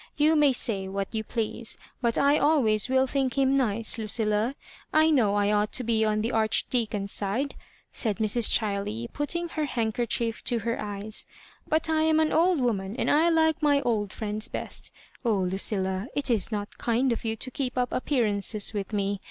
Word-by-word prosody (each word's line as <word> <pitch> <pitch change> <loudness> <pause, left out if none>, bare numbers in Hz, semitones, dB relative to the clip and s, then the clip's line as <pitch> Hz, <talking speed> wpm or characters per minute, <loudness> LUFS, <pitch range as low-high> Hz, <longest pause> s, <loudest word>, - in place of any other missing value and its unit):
You 305 +2 +4
may 295 -2 +5
say 210 -6 +1
what 195 +2 -4
you 220 -1 -2
please, 230 0 -2 0.2
but 235 -2 +1
I 285 +2 +4
always 250 -8 +2
will 260 0 +3
think 265 -1 -1
him 270 0 +3
nice, 230 -3 0
Lucilla. 215 +3 0 0.4
I 315 +1 +4
know 220 -9 +3
I 205 0 +2
ought 210 0 +1
to 255 - -1
be 225 -1 +1
on 215 -1 +1
the 230 +3 -1
Archdea 225 +1 0
con's 200 -1 -4
side," 230 +8 -2 0.4
said 215 -4 -2
Mrs. 220 +1 +3
Chiley, 210 +2 0
putting 340 +4 -2
her 310 -2 -2
hand> 230 -5 -2
kerchief 235 -1 -1
to 240 - +2
her 230 +1 -2
eyes; 205 +1 -3 0.2
" - - -28
but 315 +1 +1
I 315 -1 +1
am 315 0 +3
an 315 -1 +1
old 345 0 +3
woman, 210 -5 -1
and - - 0
I 320 +3 +4
like 320 -1 +2
my 290 -2 +3
old 210 -6 -1
friends 215 0 -2
best - - -4 0.3
Oh, 230 -3 +2
Lucilla, 190 +1 0
it 280 -3 0
is 220 -2 0
not 205 -1 -5
kind 240 +2 +1
of - - -5
you 225 -1 -2
to 255 +4 -6
keep 255 -1 -4
up 250 0 0
appearances 215 -6 0
with 205 0 -4
me. 200 -1 -1
230 Hz, 195 wpm, -26 LUFS, 210-275 Hz, 0.4 s, may